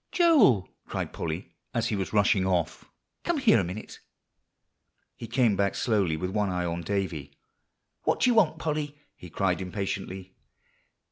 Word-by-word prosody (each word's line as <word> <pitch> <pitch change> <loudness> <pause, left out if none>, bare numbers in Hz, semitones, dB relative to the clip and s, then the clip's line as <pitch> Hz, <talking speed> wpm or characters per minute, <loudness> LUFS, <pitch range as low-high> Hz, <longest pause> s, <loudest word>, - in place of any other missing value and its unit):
"Joel," 275 - +5 0.2
cried - - -4
Polly, 85 +4 -4 0.2
as 115 -1 +1
he 110 - 0
was 95 -2 -3
rushing 100 -2 +3
off, 90 -3 -1 0.4
"come 345 -2 0
here 250 - +5
a - - +1
minute." 90 +5 -7 1.2
He 115 - -8
came 115 -2 +2
back 100 0 +1
slowly, 100 -9 +1
with 90 +3 -3
one 105 -1 0
eye 90 -1 -1
on 85 0 -2
Davie. 80 -7 -3 0.6
"What - - 0
do 250 - +5
you - - +3
want, 180 -9 +4
Polly?" 150 -2 -3 0.2
he 90 - -11
cried 95 +2 0
impatiently. 95 0 -4
100 Hz, 155 wpm, -27 LUFS, 90-125 Hz, 1.2 s, Joel